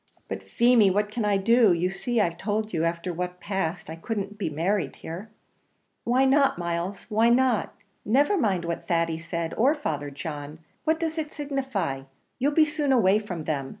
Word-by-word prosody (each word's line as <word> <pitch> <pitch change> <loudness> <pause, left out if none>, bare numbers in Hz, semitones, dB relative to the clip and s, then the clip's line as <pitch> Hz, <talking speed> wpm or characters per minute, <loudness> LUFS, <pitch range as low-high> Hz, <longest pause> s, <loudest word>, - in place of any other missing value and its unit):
"But, - - -5
Feemy, 235 -4 +4
what 205 +2 0
can 220 0 -2
I 205 -1 +3
do? 225 0 +5
you 175 +2 0
see 240 +4 -1
I've 170 -4 0
told 215 +1 -2
you 160 - 0
after 170 +1 -1
what 180 +1 -4
passed 185 -3 -3
I 160 - -6
couldn't 200 +3 -4
be 210 -5 -2
married 175 +6 -1
here." 180 +7 -8 0.8
"Why 255 +3 +3
not, 275 -3 +3
Miles? 175 +3 -3
why 225 +2 +3
not? 245 -2 +2 0.3
never 280 - +3
mind 195 - +1
what 170 0 -4
Thady 165 -1 0
said 170 0 -4
or 270 +7 +3
Father 150 - -3
John. 145 +1 -6 0.3
What 320 0 +2
does 325 -1 -2
it 305 -1 -5
signify? 265 - -2 0.4
you'll 280 +3 +2
be 310 +1 +5
soon 295 -2 -1
away 210 -5 +4
from 180 -7 -6
them. 140 -4 -2
200 Hz, 185 wpm, -26 LUFS, 170-245 Hz, 0.8 s, do